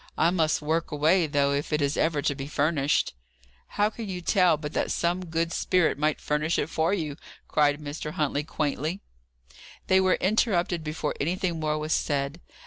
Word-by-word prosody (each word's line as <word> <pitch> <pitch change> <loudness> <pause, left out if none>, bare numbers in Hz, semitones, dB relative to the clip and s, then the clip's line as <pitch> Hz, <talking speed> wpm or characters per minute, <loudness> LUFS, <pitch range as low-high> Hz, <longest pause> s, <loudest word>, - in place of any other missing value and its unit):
I 165 +2 +3
must 160 -4 +1
work 160 +2 0
away, 160 +4 +3
though, 140 -1 +2
if 140 +2 -2
it 150 - +1
is 145 0 0
ever 155 -3 +1
to - - +1
be 135 0 -6
furnished." 145 -1 +1 0.6
"How 210 +1 +3
can 220 -2 -7
you 180 -1 -3
tell 180 -2 +3
but 150 0 -6
that - - 0
some 175 +2 0
good 165 +1 -1
spirit 180 -4 +2
might 150 0 +1
furnish 150 +2 0
it 160 - -2
for 160 +2 +1
you?" 155 -7 -2 0.3
cried 145 -1 +2
Mr. 150 +1 -6
Huntley, 150 -1 0
quaintly. 155 +4 -2 0.8
They 190 0 +4
were 185 -1 +3
interrupted 185 -4 +1
before 150 -1 -3
anything 175 +2 -1
more 155 -1 0
was 155 +1 -1
said. 145 +2 -1
155 Hz, 180 wpm, -26 LUFS, 150-175 Hz, 0.8 s, They